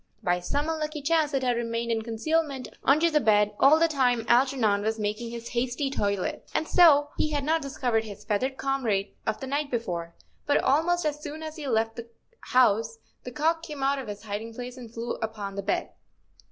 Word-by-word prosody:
By 180 0 +1
some 285 - -2
unlucky 305 -2 -3
chance 310 0 +2
it 270 -2 0
had 245 -1 +2
remained 235 0 -2
in 225 -1 0
concealment 270 +5 -1 0.2
under 310 +5 +4
the 300 - +4
bed 210 -4 +3
all 290 +3 +7
the 330 +1 +4
time 250 -6 +1
Algernon 240 -5 +3
was 220 +2 -1
making 215 +2 -3
his 235 0 -7
hasty 250 +3 -1
toilet, 200 -7 -2
and 315 - 0
so 290 -5 +6
he 310 - +2
had 290 -2 -1
not 320 +3 +1
discovered 250 -5 -1
his 205 -1 -10
feathered 255 +5 -1
comrade 235 -8 0 0.2
of - - -1
the - - -5
night 285 +2 -2
before; 175 -9 -3 0.3
but 285 - +4
almost 325 +5 +2
as 295 0 -1
soon 305 +1 -7
as 310 0 -6
he 305 -3 -6
left 225 -2 0
the 235 0 -7 0.4
house 225 -2 +3 0.3
the 250 - -5
cock 325 +5 +1
came 300 -4 -6
out 275 +1 +2
of 260 - -7
his 205 0 -7
hiding 220 +2 -5
place 245 +1 -7
and 240 -3 -10
flew 235 +1 -4
up 220 0 -4
on 200 -1 -5
the 200 - -3
bed. 345 - -1
250 Hz, 205 wpm, -27 LUFS, 225-295 Hz, 0.4 s, all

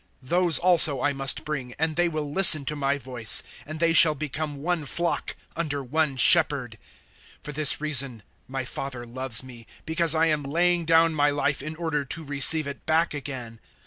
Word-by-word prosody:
Those 175 +4 +3
also 170 -5 +5
I 145 - 0
must 135 0 0
bring, 130 -5 -6
and 160 +1 -2
they 175 +1 0
will 155 -3 -6
listen 155 -4 +6
to 150 - -4
my 140 -1 -2
voice; 125 -5 +2 0.2
and 155 +1 -8
they 165 0 +1
shall 160 -1 +6
become 150 0 -6
one 175 -1 -2
flock 170 +4 -4 0.2
under 145 -4 -4
one 145 +1 -2
Shepherd. 140 - +3 0.6
010:017 - - -43
For 150 - -8
this 150 0 -1
reason 135 -7 -1 0.2
my 130 0 -6
Father 125 -1 -7
loves 125 0 -1
me, 120 -3 -14 0.2
because 160 0 +1
I 160 +1 +1
am 155 -2 -1
laying 170 +4 -1
down 165 0 +2
my 145 -1 +1
life 145 -1 -2
in 155 +3 -7
order 160 -3 -3
to 160 +4 -6
receive 145 +2 +1
it 140 -1 -9
back 160 +1 0
again. 130 -6 -8
150 Hz, 185 wpm, -23 LUFS, 135-160 Hz, 0.6 s, listen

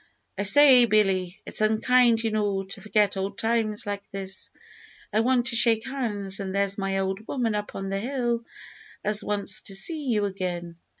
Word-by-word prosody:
"I 195 - -3
say, 255 +3 +7
Billy, 195 -4 +1
it's - - 0
unkind, 230 +2 +3
you 225 - -1
know, 205 -2 -1
to 195 +1 -9
forget 210 -2 +1
old 195 +1 -4
times 225 -2 -1
like 205 -1 -4
this. 195 -1 -5 0.6
I 215 - +2
want 245 +1 +2
to 235 0 0
shake 230 -1 +3
hands; 210 -8 -3
and 195 -1 -4
there's 200 0 0
my 195 -1 -2
old 195 +3 -3
woman 240 -5 -1
up 210 0 -4
on 195 0 -5
the 195 0 -2
hill 240 0 -2 0.6
as 210 0 +1
wants 205 -1 -1
to 195 - -5
see 300 - -1
you 215 -4 +1
again." 175 -3 -5
210 Hz, 180 wpm, -25 LUFS, 195-235 Hz, 0.6 s, say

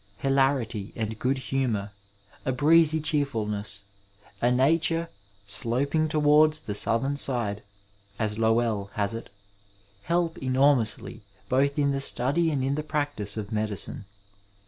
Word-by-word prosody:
Hilarit7 135 -6 +1
and 110 -1 -4
good 135 +2 0
humour, 125 -7 -2 0.5
a 130 - 0
breez7 155 +3 +4
cheerfulness, 105 -9 -2 0.6
a 120 - +3
nature 165 +6 +2 0.2
" 100 - -34
sloping 135 +9 0
toward 150 0 +4
the 155 -9 -4
southern 115 +7 +1
side,*' 115 -7 0 0.6
as 105 0 -2
Lowell 110 -3 +1
has 100 0 -1
it, 115 - -7 0.7
help 170 +6 -1
enormousl7 130 -4 +1 0.3
both 140 +2 +2
in 140 -1 +2
the 135 - -1
stud7 140 +5 +1
and 135 -3 -1
in 135 +1 0
the 150 - -1
practice 145 -9 -2
of 105 0 -5
medicine. 105 -2 -2
130 Hz, 125 wpm, -26 LUFS, 110-145 Hz, 0.7 s, breez7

